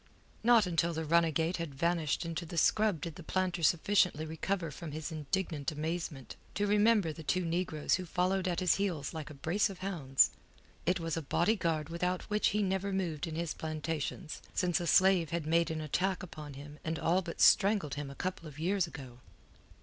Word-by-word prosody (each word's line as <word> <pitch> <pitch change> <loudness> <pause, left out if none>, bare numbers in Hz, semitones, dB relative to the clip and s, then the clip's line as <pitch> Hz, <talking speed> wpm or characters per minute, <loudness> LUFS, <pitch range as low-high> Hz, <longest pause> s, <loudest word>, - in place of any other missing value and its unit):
Not 230 -2 +6
until 170 -1 +1
the 160 0 -3
runagate 165 +1 +2
had 165 -5 -5
vanished 170 0 0
into 165 +1 -3
the 170 +1 -7
scrub 210 0 +3
did 165 -3 -5
the - - -8
planter 185 +1 -1
sufficiently 170 0 +3
recover 165 +1 -2
from 155 +1 -7
his 155 +1 -5
indignant 155 0 -2
amazement 155 -3 -4 0.2
to 205 - +1
remember 205 -4 +3
the 160 - -9
two 160 +5 0
negroes 165 -2 -1
who 185 -1 0
followed 185 +2 0
at 175 -1 -1
his 180 - +3
heels 175 -8 -2
like 155 -1 -6
a 150 - -10
brace 175 +10 +1
of 195 - -8
hounds. 140 -9 +3 0.6
It 180 +1 +2
was 165 -1 -2
a - - -1
bodyguard 165 -1 0
without 180 +2 -1
which 210 0 +3
he 210 +1 +1
never 190 +1 -1
moved 175 -6 -2
in 160 - -5
his 165 -1 -2
plantations 155 0 -4
since 175 -3 +1
a 175 - -3
slave 185 -4 +5
had 170 -1 -2
made 165 +2 +2
an 160 -1 -3
attack 185 +5 -1
upon 150 -5 -8
him 145 +2 -10
and 160 +1 -2
all 170 +3 +2
but 170 -2 -7
strangled 195 -8 +5
him 145 -1 -4
a 140 - -9
couple 185 -1 -4
of 150 -2 -11
years 180 +3 +1
ago. 135 -5 -10
170 Hz, 195 wpm, -32 LUFS, 155-185 Hz, 0.6 s, Not